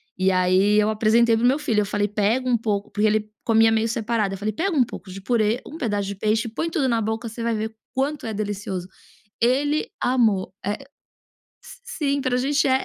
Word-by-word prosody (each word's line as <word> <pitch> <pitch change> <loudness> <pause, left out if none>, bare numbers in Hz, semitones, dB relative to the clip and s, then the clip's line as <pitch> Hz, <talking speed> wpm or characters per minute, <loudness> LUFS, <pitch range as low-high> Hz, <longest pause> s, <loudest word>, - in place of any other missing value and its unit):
E 185 +1 +2
aí, 185 +3 +3
eu 210 +1 +2
apresentei 225 +2 +3
para 225 - -1
o - - +5
meu 270 +3 +3
filho, 220 -7 +1
eu - - -1
falei: 205 0 0
"Pega 215 +5 0
um 245 - +3
pouco", 210 -3 -2
porque 215 +1 +2
ele 215 0 +1 0.2
comia 225 -1 +4
meio 225 +1 +1
separado, 220 -3 -1
eu - - -8
falei: 210 +2 -2
"Pega 380 - -1
um 255 - +6
pouco 210 - -9
de 195 +1 -7
purê, 225 +1 +1
um 305 - -9
pedaço 205 -9 -2
de 200 - -3
peixe, 215 +3 0
põe 320 +9 -3
tudo 300 -7 0
na 230 -2 +1
boca, 220 +2 -2
você 225 +1 -7
vai 230 -1 0
ver 220 +1 -4 0.2
quanto 275 -1 -1
é - - -3
delicioso". 200 -3 -4 0.5
Ele 290 - +1 0.2
amou, 220 -7 +1
eh 205 +2 -1 0.9
s - - -12
sim, 295 - -1
para 255 -1 0
gente 275 +2 +1
é - - +2
220 Hz, 220 wpm, -23 LUFS, 205-250 Hz, 0.9 s, um